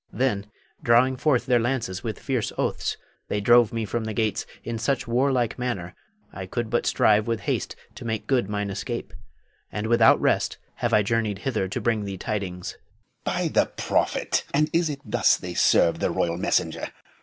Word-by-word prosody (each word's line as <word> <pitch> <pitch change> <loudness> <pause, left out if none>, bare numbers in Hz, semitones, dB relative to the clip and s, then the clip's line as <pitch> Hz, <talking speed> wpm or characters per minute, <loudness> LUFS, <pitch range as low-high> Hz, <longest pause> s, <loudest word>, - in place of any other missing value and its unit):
Then, 105 -4 0 0.3
drawing 125 +3 +4
forth 130 -1 +1
their 125 -2 +3
lances 115 -6 -2
with 110 -2 -3
fierce 130 -5 -2
oaths, - - -1 0.3
they 105 - -1
drove 120 +2 +5
me 115 -2 -2
from 110 +2 -3
the 110 -1 -4
gates 110 -1 0 0.2
in 115 -1 -4
such 120 +2 -1
warlike 125 0 +1
manner, 95 -8 -3 0.4
I 95 -1 -6
could 115 +2 -3
but 120 - +1
strive 105 0 +3
with 115 -1 -1
haste - - -2 0.2
to - - -10
make 110 -2 -3
good 125 -5 +1
mine 105 -1 -2
escape, 95 - -5 0.6
and 105 +1 -3
without 115 +1 +5
rest - - +1 0.2
have 120 - -1
I 110 -2 +4
journeyed 110 -1 0
hither 105 -3 -1
to 95 - -3
bring 115 -3 0
thee 100 -1 -5
tidings. 95 -4 -4
Moh'd. - - -41
By - - 0
the - - +3
prophet! - - 0
and 150 +1 +2
is 170 -1 +2
it 140 -2 -5
thus 105 - +3
they 90 -1 -6
serve 85 -1 +4
the - - +1
royal 85 -1 0
messenger. - - 0
115 Hz, 185 wpm, -25 LUFS, 105-120 Hz, 0.6 s, drove